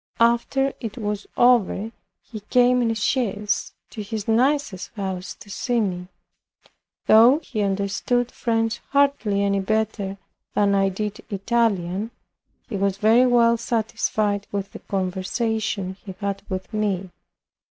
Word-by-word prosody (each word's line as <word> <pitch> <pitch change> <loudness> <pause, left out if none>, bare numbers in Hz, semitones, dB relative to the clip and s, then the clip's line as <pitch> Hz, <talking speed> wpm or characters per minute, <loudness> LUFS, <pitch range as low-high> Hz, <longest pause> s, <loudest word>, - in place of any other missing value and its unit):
After 235 +4 +2
it 225 -1 -6
was 210 -3 -3
over, 230 -3 +3 0.3
he 220 - -8
came 250 +4 +3
in 235 - +1
a 225 - 0
chaise 210 -2 -1 0.2
to 220 - -6
his 210 0 -5
niece's 245 -3 +1
house 190 -3 -4
to - - -15
see 245 +3 0
me. 180 -4 -2 1.0
Though 235 +6 +7
he 215 -4 -3
understood 200 +5 0
French 225 -1 -1
hardly 275 -8 +2
any 200 0 +1
better 205 -1 -1 0.4
than 205 -1 +3
I 195 0 +3
did 210 +2 -4
Italian, 200 -2 0 0.6
he 215 - -4
was 195 0 0
very 225 +5 +5
well 235 -1 +4
satisfied 215 -3 -1
with 200 -1 -3
the - - -9
conversation 195 +1 -2
he 190 -2 -8
had 200 -1 -3
with 185 +3 -5
me. 195 -4 -1
210 Hz, 130 wpm, -23 LUFS, 195-235 Hz, 1.0 s, Though